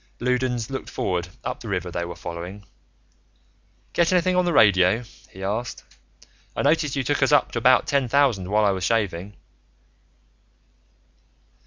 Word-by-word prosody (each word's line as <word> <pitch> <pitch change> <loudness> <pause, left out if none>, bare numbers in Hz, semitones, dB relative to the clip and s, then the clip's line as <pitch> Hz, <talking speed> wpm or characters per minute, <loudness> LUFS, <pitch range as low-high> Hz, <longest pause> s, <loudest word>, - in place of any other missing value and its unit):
Loudons 125 -1 -1
looked 135 - -5
forward, 90 -1 -2 0.2
up - - -4
the - - -9
river 90 0 -2
they 85 0 -3
were 85 0 -7
following. 90 +4 -8 1.3
"Get 170 0 +2
anything 185 0 +2
on 180 0 +2
the 175 - +1
radio?" 105 - +4 0.3
he 95 - -10
asked. 110 +5 -3 0.7
"I - - -1
noticed 150 -1 +2
you 135 - -1
took 145 +2 -1
us 135 - +3
up 145 -2 +3
to 120 - -2
about 125 +2 +4
ten 140 -2 +1
thousand, 120 -8 +2
while 105 +1 +3
I 100 - +4
was 95 -1 -3
shaving." 100 -1 -1
115 Hz, 155 wpm, -23 LUFS, 95-135 Hz, 1.3 s, radio